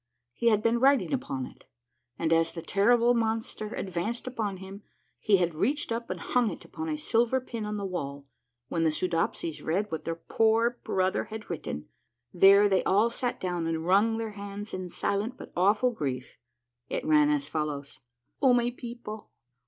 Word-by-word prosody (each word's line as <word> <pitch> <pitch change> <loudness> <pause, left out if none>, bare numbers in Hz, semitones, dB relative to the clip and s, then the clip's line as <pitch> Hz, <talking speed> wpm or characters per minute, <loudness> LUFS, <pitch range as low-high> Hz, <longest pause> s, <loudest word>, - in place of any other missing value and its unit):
He 235 - -1
had 215 -2 +4
been 230 +1 +3
writing 265 -6 +4
upon 190 - -2
it, - - -15 0.5
and 165 0 +1
as 165 0 +2
the 165 - -6
terrible 235 +6 +4
monster 225 -2 -1
advaneed 190 +6 -3
upon 220 -6 -3
him, 190 +2 -9 0.4
he 205 -2 +4
had 175 -2 0
reached 265 - 0
up 230 +1 -3
and 185 - -3
hung 245 +5 +1
it - - -8
upon 320 0 -5
a 305 - -1
silver 240 -3 +2
pin 230 -4 -5
on 210 0 -3
the 200 - -3
wall. 140 -7 -4 0.4
When 165 +3 -1
the 160 - +4
Soodopsies 165 -1 -1
read 195 +6 -1
what 160 - -3
their 165 - -2
poor 225 +7 +2
brother 185 0 0
had 220 -2 -8
written, 75 - -5 0.5
there 200 +3 +7
they 190 -2 +2
all 210 +5 +3
sat 245 +1 -2
down 175 -3 -2
and 165 0 -2
wrung 205 +5 +3
their 225 -1 -3
hands 205 0 -7
in 185 -1 -4
silent 200 +7 -2
but - - -11
awful 210 +7 +3
grief: 130 - -4 0.5
it - - -3
ran 300 -1 +5
as 295 -1 0
follows: 145 -3 -4
— 120 0 -56
" - - -48
O 260 -3 +6
my 240 0 +2
people 235 -4 -8
205 Hz, 185 wpm, -28 LUFS, 170-235 Hz, 0.5 s, there